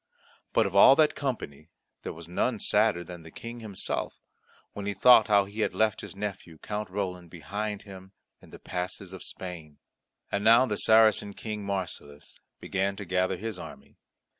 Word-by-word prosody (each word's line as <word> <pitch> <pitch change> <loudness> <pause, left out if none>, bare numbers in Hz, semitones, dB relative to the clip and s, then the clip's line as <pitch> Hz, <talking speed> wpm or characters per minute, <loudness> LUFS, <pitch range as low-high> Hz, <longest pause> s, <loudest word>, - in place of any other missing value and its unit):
But - - +3
of 100 0 -4
all 115 +7 +9
that 155 0 +4
company 85 - -5 0.3
there - - -5
was 85 0 -11
none 110 +7 0
sadder 105 -4 +2
than 85 0 -10
the 80 - -12
King 115 +8 -9
himself, 105 -4 -4 0.5
when 100 0 -6
he 100 - -2
thought 125 -3 +7
how 100 -2 +4
he 100 +3 -10
had 110 - 0
left 110 -1 +1
his - - -9
nephew 100 -5 -6
Count 105 +4 -5
Roland 90 -3 -4
behind 105 +5 -5
him 95 -2 -12 0.3
in - - -17
the - - -11
passes 90 +1 -5
of 95 - -9
Spain. 80 -5 -7 0.5
And 100 - -1
now 115 +4 +7
the 105 -4 -2
Saracen 110 -2 +4
King 105 0 -6
Marsilas 90 -7 -6 0.2
began 95 0 -1
to 100 0 -7
gather 90 +1 0
his 110 -1 -5
army. - - -12
100 Hz, 175 wpm, -28 LUFS, 90-110 Hz, 0.5 s, all